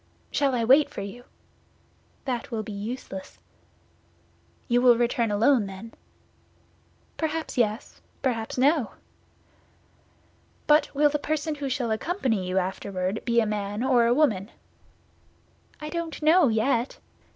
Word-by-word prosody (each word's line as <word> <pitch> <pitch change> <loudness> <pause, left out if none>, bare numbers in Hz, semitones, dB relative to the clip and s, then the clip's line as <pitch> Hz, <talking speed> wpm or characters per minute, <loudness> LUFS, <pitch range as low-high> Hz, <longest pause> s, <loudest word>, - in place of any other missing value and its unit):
"Shall 275 -3 +1
I 235 - 0
wait 270 +6 +5
for - - -7
you?" 230 +5 -8 1.0
"That 245 -3 -3
will 225 -3 -3
be 215 - -8
useless." 205 -2 -7 1.3
"You 245 0 +3
will 245 -2 +6
return 235 -1 +1
alone, 220 +2 +3
then?" 195 +4 -9 1.2
"Perhaps 320 0 -3
yes, 220 -2 -1 0.2
perhaps 230 -4 -2
no." 275 -1 +2 1.7
"But 300 +1 +4
will 295 +1 +4
the 295 - -1
person 310 +1 -2
who 285 -2 -4
shall 250 -3 -1
accompany 225 - -1
you 185 +1 -1
afterward 190 +1 -2
be 235 -1 +3
a - - +1
man 210 +1 -3
or 250 -3 +4
a 235 - +4
woman?" 215 -9 +2 1.3
"I 300 - -6
don't 335 0 -4
know 320 +1 +5
yet." 235 +2 0
240 Hz, 130 wpm, -26 LUFS, 215-285 Hz, 1.7 s, will